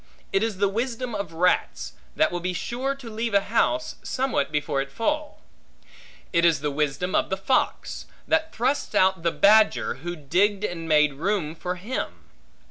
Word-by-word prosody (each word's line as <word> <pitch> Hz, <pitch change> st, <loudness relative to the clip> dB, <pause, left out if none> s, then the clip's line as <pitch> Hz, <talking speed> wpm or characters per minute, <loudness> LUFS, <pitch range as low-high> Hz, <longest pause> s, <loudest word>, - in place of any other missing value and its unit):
It 195 Hz, -, +3 dB
is 220 Hz, -3 st, -1 dB
the 200 Hz, +1 st, +3 dB
wisdom 235 Hz, +3 st, -3 dB
of 200 Hz, -5 st, -4 dB
rats, 175 Hz, +2 st, 0 dB, 0.2 s
that -, -, +3 dB
will 175 Hz, -, -2 dB
be 180 Hz, +1 st, -2 dB
sure 255 Hz, +9 st, -2 dB
to 270 Hz, -3 st, -11 dB
leave 225 Hz, -1 st, -2 dB
a -, -, +7 dB
house, 310 Hz, +9 st, 0 dB
somewhat 255 Hz, -, -1 dB
before 150 Hz, -2 st, 0 dB
it 135 Hz, -, -5 dB
fall. 300 Hz, -, -2 dB, 0.9 s
It 170 Hz, -1 st, +3 dB
is 165 Hz, -4 st, +4 dB
the 150 Hz, 0 st, -1 dB
wisdom 150 Hz, +5 st, -1 dB
of -, -, +2 dB
the 190 Hz, -, -1 dB
fox, 195 Hz, +7 st, -1 dB, 0.2 s
that 320 Hz, 0 st, +1 dB
thrusts 260 Hz, +5 st, -1 dB
out 190 Hz, -1 st, +3 dB
the 170 Hz, -, +2 dB
badger, 200 Hz, -, +4 dB
who 175 Hz, +2 st, -4 dB
digged 190 Hz, +7 st, +1 dB
and 165 Hz, -4 st, -4 dB
made 150 Hz, -2 st, +4 dB
room 165 Hz, +1 st, -1 dB
for 180 Hz, +2 st, -4 dB
him. 210 Hz, +9 st, -5 dB
190 Hz, 175 wpm, -25 LUFS, 165-230 Hz, 0.9 s, a